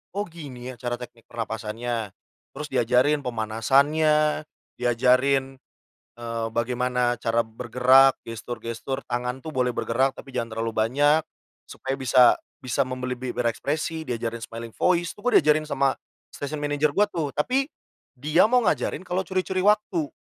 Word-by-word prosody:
"Oh 205 - 0
gini 140 -9 -9
ya 120 - -17
cara 120 -1 -2
teknik 120 -2 -12
pernapasannya." 115 -1 -4 0.4
Terus 150 - -5
diajarin 125 +4 +3
pemanasannya, 140 +7 +2 0.3
diajarin, 130 +2 +2 0.6
eee, 115 -1 -3
bagaimana 125 +1 0
cara 115 0 +1
bergerak 125 +4 +4
gestur-gestur 115 +3 -5
tangan 125 +1 -2
tuh 155 +3 -8
boleh 125 -1 +1
bergerak 130 +3 0
tapi 135 -2 -11
jangan 115 -2 -3
terlalu 115 0 -2
banyak, 145 +8 +3 0.5
supaya 135 0 -4
bisa 130 -1 +5 0.3
bisa 125 -3 -3
membeli 130 -1 -4
be 125 +1 -6
berekspresi, 155 +7 -1
diajarin 115 -1 -3
smiling 115 0 -7
voice, 175 -1 +1
itu - - -15
gue 250 - +5
diajarin 155 +1 +3
sama 140 -3 +1 0.4
station 145 +2 -4
manager 145 0 +1
gua 205 - +6
tuh. 165 -7 -3
Tapi 260 - +1 0.5
dia 155 +9 +4
mau 250 - +5
ngajarin 185 - 0
kalau 180 +1 0
curi-curi 185 0 -1
waktu. 205 -6 +2
130 Hz, 140 wpm, -25 LUFS, 120-150 Hz, 0.6 s, gua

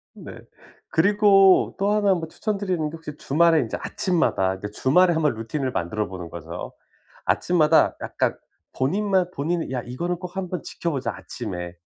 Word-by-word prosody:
네. - - -10 0.5
그리고 195 +1 +5
또 200 +1 +2
1 205 -2 +3
뭐 165 -2 -4
추천드리는데, 180 -4 -2
혹시 160 -2 -9
주말에 165 +3 +3
인제 115 - -3
아침마다 175 - 0
이렇게 95 +2 -6
주말에 175 - +3
한번 155 -3 +1
루틴을 130 +4 -3
만들어 105 +2 -2
보는 90 -3 -8
거죠. 85 +1 -7 0.5
아침마다 170 -4 +3
약간 - - -1 0.4
본인만 190 +5 +1
본인이 160 +1 -2
'야, 125 - -1
이거는 170 +9 -3
꼭 180 +1 -9
한번 185 -2 -3
지켜보자, 150 -6 -3
아침에.' 90 -1 -6
165 Hz, 340 characters per minute, -24 LUFS, 125-185 Hz, 0.5 s, 그리고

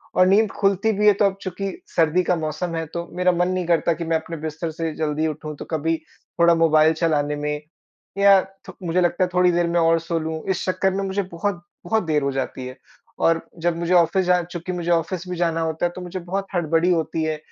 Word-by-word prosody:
और 185 - +5
नींद 205 +2 +4
खुलती 200 +2 +1
भी 210 +1 +2
है 210 - +8
तो 205 - +5
अब 195 -1 0
चूँकि 195 +1 -4 0.3
सर्दी 165 +2 +3
का 180 - +1
मौसम 165 +2 -3
है 165 0 -2
तो 170 0 -3
मेरा 180 0 +3
मन 175 0 +1
नहीं 185 -1 -1
करता 170 0 +2
कि 170 +1 -5
मैं 165 0 0
अपने 165 +1 -7
बिस्तर 160 +1 -4
से 165 0 -3
जल्दी 155 0 -1
उठूँ 155 0 -5
तो - - -6
कभी 160 +1 0 0.4
थोड़ा 170 0 +6
मोबाइल 160 -1 +4
चलाने 150 -3 0
में। 150 0 -3 0.6
या 200 0 +6 0.3
थो 190 - -8
मुझे 175 +2 +2
लगता 175 +1 +2
है 180 - 0
थोड़ी 180 0 +4
देर 175 0 +1
मैं 170 0 +1
और 165 0 +3
सो 165 +1 -3
लूँ, 160 0 -4
इस 185 - 0
चक्कर 185 +1 +1
में 195 +1 -2
मुझे 195 +1 -1
बहुत 175 0 -3 0.2
बहुत 220 -1 +1
देर 155 -3 +1
हो 140 - 0
जाती 130 -1 -4
है। 130 - -9 0.4
और 165 0 +3 0.2
जब 170 -1 +1
मुझे 170 +1 -1
ऑफिस 180 +2 +3
जा 180 0 +3
चूँकि 175 +1 -6
मुझे 175 -1 -2
ऑफिस 170 +2 -1
भी 180 - -3
जाना 165 -1 0
होता 160 +1 -1
है 175 - 0
तो 185 - -7
मुझे 180 +1 -5
बहुत 190 +3 -3
हड़बड़ी 165 +1 +2
होती 160 -1 0
है। 155 -1 -1
170 Hz, 235 wpm, -22 LUFS, 160-180 Hz, 0.6 s, है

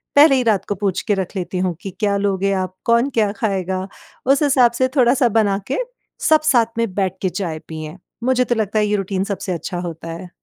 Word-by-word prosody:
पहले 285 -1 +7
ही 255 - +2
रात 215 -5 +1
को 205 - 0
पूछ 195 -1 -1
के 210 - 0
रख 190 +1 -4
लेती 180 0 -3
हूँ 180 -2 0
कि 195 - -6
क्या 205 -2 +1
लोगे 195 -1 0
आप? 185 -1 -2
कौन 235 +3 +3
क्या 220 -6 +1
खाएगा? 190 -3 -2 0.4
उस 275 +3 +3
हिसाब 260 -4 +4
से 255 +2 +1
थोड़ा-सा 250 -1 +4
बना 205 -3 +2
के 260 - -1 0.5
सब 310 -1 +5
साथ 235 -7 +2
में 230 -4 -1
बैठ 190 -2 0
के 185 - +1
चाय 175 -4 -4
पिएँ। 155 +1 -7 0.3
मुझे 255 0 +3
तो 240 - 0
लगता 215 -1 0
है 210 - +2
ये 210 - +1
रूटीन 195 -1 -1
सबसे 200 -1 -4
अच्छा 175 +2 -4
होता 165 -2 -6
है। 175 +2 -8
205 Hz, 225 wpm, -20 LUFS, 185-235 Hz, 0.5 s, पहले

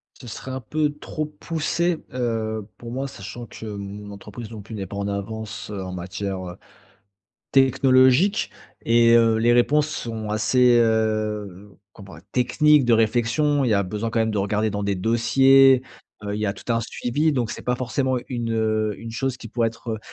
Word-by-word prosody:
Ce 125 - -13
serait 125 +3 -7
un 130 - -4
peu 150 +5 -1
trop 155 0 -4
poussé, 165 +2 -2
heu, 110 -4 -2
pour 115 -1 -9
moi, 135 +3 -3
sachant 120 -1 -8
que 115 - -10
mon 100 0 -7
entreprise 105 +3 -9
non 110 -2 -8
plus 110 +2 -9
n'est 100 -2 -4
pas 100 +2 -8
en 100 0 -2
avance, 110 +2 -5
heu, 100 -2 -4
en 95 -1 -6
matière, 95 +2 -4
heu, 90 - -10 1.0
technologique. 135 - +4 0.3
Et 115 0 +4
heu, 115 -1 +5
les 120 +1 +3
réponses 145 +5 +3
sont 115 -7 -5
assez, 120 +3 +3
heu, 110 -3 -1 0.2
comment, 100 -5 -12 0.2
techniques 150 +3 +4
de 120 - +3
réflexion. 120 +6 +2
Il - - +1
y - - +4
a 100 0 +2
besoin 105 +4 -3
quand 115 - -1
même 110 0 +1
de 105 - -1
regarder 105 +2 0
dans 105 0 -3
des 100 -1 -1
dossiers. 130 +5 +5 0.4
Heu, 100 0 -3
il 105 - -3
y 105 - 0
a 100 - 0
tout 110 +4 -4
un 115 - +1
suivi, 145 +7 -1
donc 125 -5 -1
c'est - - -8
pas 125 0 0
forcément 130 +1 -1
une, 120 -3 -3
heu, 110 -1 0
une 115 0 -8
chose 125 +3 -2
qui 120 - -10
pourrait 115 +1 0
être, 115 +1 -9
heu, 110 - -3
115 Hz, 195 wpm, -23 LUFS, 105-130 Hz, 1.0 s, heu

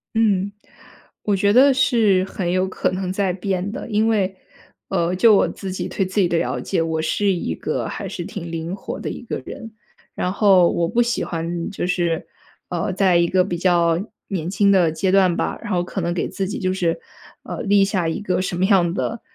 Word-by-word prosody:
嗯， 200 -3 +2 0.7
我 205 - +1
觉 200 +1 +2
得 270 +3 +6
是 220 -7 +3
很 185 -2 -3
有 185 +1 +1
可 185 - -1
能 185 0 -3
在 190 -1 0
变 190 +1 -2
的。 250 +1 -7
因 215 0 +2
为， 195 -4 +1 0.5
呃， 170 +1 0
就 215 +3 +6
我 - - +3
自 190 -2 -6
己 185 - -3
对 195 - -1
自 190 +3 -2
己 185 - +4
的 170 - 0
了 - - -1
解， 190 - -1
我 160 -1 -1
是 200 +5 +1
一 170 - -2
个 - - -3
还 - - -5
是 175 - -5
挺 170 -3 -7
灵 165 +2 -4
活 - - -6
的 - - -4
一 - - -6
个 - - -4
人。 230 -5 -8 0.4
然 180 - -1
后 195 -4 +5
我 170 - 0
不 230 +7 +1
喜 235 -1 0
欢 170 0 -3
就 195 - -3
是， 175 -2 0 0.4
呃， 175 +2 -2
在 185 -2 +3
一 170 0 +3
个 185 +1 +3
比 180 -2 -3
较 170 -2 +2 0.3
年 175 -4 -3
轻 200 +1 +3
的 180 -5 +4
阶 185 +4 0
段 185 -3 +4
吧， - - -2
然 - - -6
后 175 -1 +1
可 185 +2 -4
能 170 0 -1
给 175 - -1
自 195 -1 -3
己 205 - -4
就 185 -1 0
是， 170 -3 0 0.4
呃， - - -6
立 200 -1 +4
下 190 -4 -1
一 160 - -2
个 185 -3 0
什 185 - -3
么 185 - +2
样 190 -4 +3
的 225 +3 -3
185 Hz, 235 characters per minute, -21 LUFS, 175-200 Hz, 0.7 s, 得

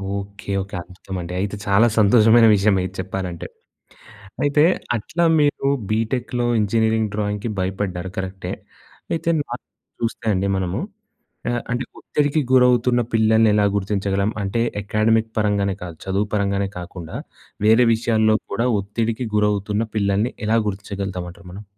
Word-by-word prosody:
Okay. 100 +1 -7
Okay. 100 +1 -7
అద్భుతమండి! 90 0 -7
అయితే, 100 +2 -2
చాలా 100 +4 +5
సంతోషమైన 115 +2 +6
విషయమే 100 -1 +3
ఇది 95 - -15
చెప్పాలంటే. 95 -2 -4 1.0
అయితే, 145 +1 +4 0.3
అట్లా 160 +10 -1 0.2
మీరు 145 -1 +1 0.2
బీటెక్‍లో 120 +2 -1
ఇంజనీరింగ్ 110 +1 +1
డ్రాయింగ్‌కి 105 +1 -2
భయపడ్డారు, 95 -1 -2
కరెక్టే. 95 0 -4 0.6
అయితే 165 0 0
నార్మల్‌గా 125 -3 -9
చూస్తే 115 0 -3
అండి 95 +1 0
మనము 95 0 -2 0.7
ఆహ్, 120 0 0
అంటే 125 +2 -1
ఒత్తిడికి 145 +1 0
గురవుతున్న 125 -1 +4
పిల్లల్ని 110 0 +4
ఎలా 105 -1 +3
గుర్తించగలం? 100 0 0
అంటే, 100 +4 -1 0.2
అకాడమిక్ 110 +2 +1
పరంగానే 100 -2 +1
కాదు, 85 -2 -7
చదువు 95 +2 0
పరంగానే 100 -1 0
కాకుండా 85 -2 -8 0.5
వేరే 115 +3 +6
విషయాల్లో 110 -1 +2 0.2
కూడా 115 +5 0
ఒత్తిడికి 110 +4 -2
గురవుతున్న 105 0 +1
పిల్లల్ని 100 +3 +1
ఎలా 115 +2 +3
గుర్తించగలుగుతామంటారు 95 -2 -5
మనం? 100 +3 -8
105 Hz, 125 wpm, -21 LUFS, 95-115 Hz, 1.0 s, సంతోషమైన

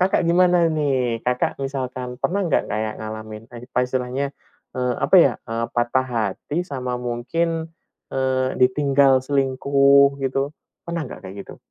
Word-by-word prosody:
Kakak 185 +1 +2
gimana 175 0 +4
nih? 130 -6 0
Kakak 125 0 0
misalkan 130 -2 -4
pernah 200 +3 0
nggak 165 - +1
kayak 110 +1 -2
ngalamin, 110 0 -7
apa 120 +1 -6
istilahnya, 130 +2 -2 0.4
apa 125 +8 +2
ya, 140 - +5 0.2
eee, 115 +1 -2
patah 120 +2 +1
hati 120 - -2
sama 130 -4 -4
mungkin, 160 +8 -2 0.4
eee, 130 -1 0
ditinggal 135 0 +4
selingkuh 140 0 +3
gitu, 135 +2 -1 0.3
pernah 170 -1 -3
nggak - - -9
kayak 95 - -9
gitu? - - -11
130 Hz, 135 wpm, -22 LUFS, 125-140 Hz, 0.4 s, ya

